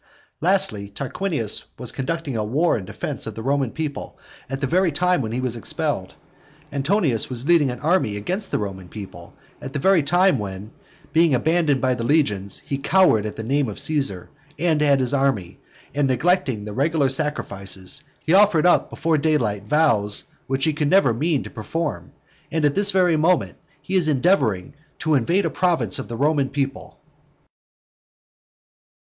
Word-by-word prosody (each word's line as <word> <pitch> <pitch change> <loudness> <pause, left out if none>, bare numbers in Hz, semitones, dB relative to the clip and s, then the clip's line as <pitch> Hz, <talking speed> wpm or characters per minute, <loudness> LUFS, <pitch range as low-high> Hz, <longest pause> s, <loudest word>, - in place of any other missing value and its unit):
Lastly, 175 - +2
Tarquinius 135 - -2
was - - -2
conducting 150 0 -3
a 110 - -1
war 145 +11 +1
in 95 - -4
defence - - -5
of - - -6
the 110 - -6
Roman 135 -1 0
people 150 +1 -5 0.3
at 135 0 -3
the 140 - -1
very 180 +4 +2
time 180 +2 +1
when 110 -3 -4
he 120 - -2
was 130 -2 -2
expelled. 115 - -3 0.6
Antonius 140 - +1
was 125 0 -4
leading 160 -4 +4
an 125 -1 -5
army 155 - +1
against 185 - -3
the - - 0
Roman 95 -3 -6
people 100 -3 -10 0.3
at 135 - -7
the 180 +5 +3
time 175 +4 +3
when, 100 +1 -6 0.4
being 160 -3 +4
abandoned 155 0 +1
by 130 0 +2
the 120 -2 -4
legions, 105 -9 +1
he 140 - -3
cowered 140 - +3
at 105 - -6
the 110 - -6
name 135 +2 0
of 105 - -7
Caesar 135 - 0 0.3
and 160 -1 +1
at 140 -2 +4
his 130 +2 0
army, 135 -11 0 0.3
and 145 0 +1
neglecting 130 - +1
the 105 - -6
regular 145 +3 +1
sacrifices, 100 -6 -3 0.2
he 160 - +2
offered 190 -5 +5
up 180 - +4
before 160 -2 0
daylight 120 -10 0
vows 110 -8 +2 0.2
which 135 +1 0
he 155 - +1
could 150 -1 -1
never 180 -9 +4
mean 150 +4 0
to - - -10
perform, 145 +7 -4 0.4
and 160 -2 +1
at 145 - +3
this 200 +3 +1
very 180 -4 +3
moment 170 +3 +1 0.3
he 185 - -6
is 180 -4 +2
endeavouring 135 - +1 0.2
to 155 - 0
invade 170 +9 +2
a - - +1
province 165 - 0
of - - -6
the 115 - -6
Roman 145 0 +1
people. 135 -1 -4
140 Hz, 170 wpm, -22 LUFS, 115-165 Hz, 0.6 s, offered